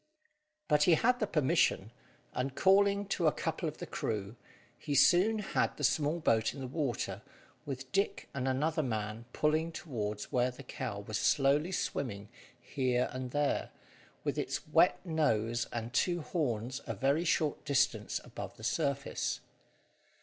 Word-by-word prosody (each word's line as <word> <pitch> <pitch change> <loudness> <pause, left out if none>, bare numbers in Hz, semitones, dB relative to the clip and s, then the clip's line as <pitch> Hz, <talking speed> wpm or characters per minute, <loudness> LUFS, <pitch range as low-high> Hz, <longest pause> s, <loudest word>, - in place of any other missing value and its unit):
But 150 +3 +4
he 175 -3 +6
had 245 +7 +2
the 215 - 0
permission, 145 - +2 0.4
and 130 +1 -2
calling 200 +1 +4
to 170 -4 +1
a - - +5
couple 160 +1 -2
of 150 - -11
the - - -6
crew, 105 0 -3 0.4
he 145 - -3
soon 185 +10 +5
had 210 - -1
the 145 - -6
small 150 +4 +2
boat 115 -7 +2
in - - -8
the 135 - -4
water, 135 -1 -2 0.5
with 135 -1 -6
Dick 200 +1 0
and 135 -1 -2
another 155 +5 +1
man 110 -3 -3
pulling 155 +2 +1
towards 105 -11 -4
where 125 0 +2
the 125 +2 -10
cow 120 -5 -5
was 105 +1 -3
slowly 145 +4 +3
swimming 105 - -3 0.3
here 125 0 0
and 130 0 -4
there, 145 +2 0 0.5
with - - -1
its - - -3
wet - - +5
nose 120 -8 +1
and 115 0 -4
two 175 +6 +1
horns 125 -7 -2
a - - -3
very 140 +5 +2
short 160 -3 +1
distance 140 -1 +1
above - - -8
the 110 - -13
surface. 140 +2 -1
140 Hz, 155 wpm, -32 LUFS, 120-160 Hz, 0.5 s, he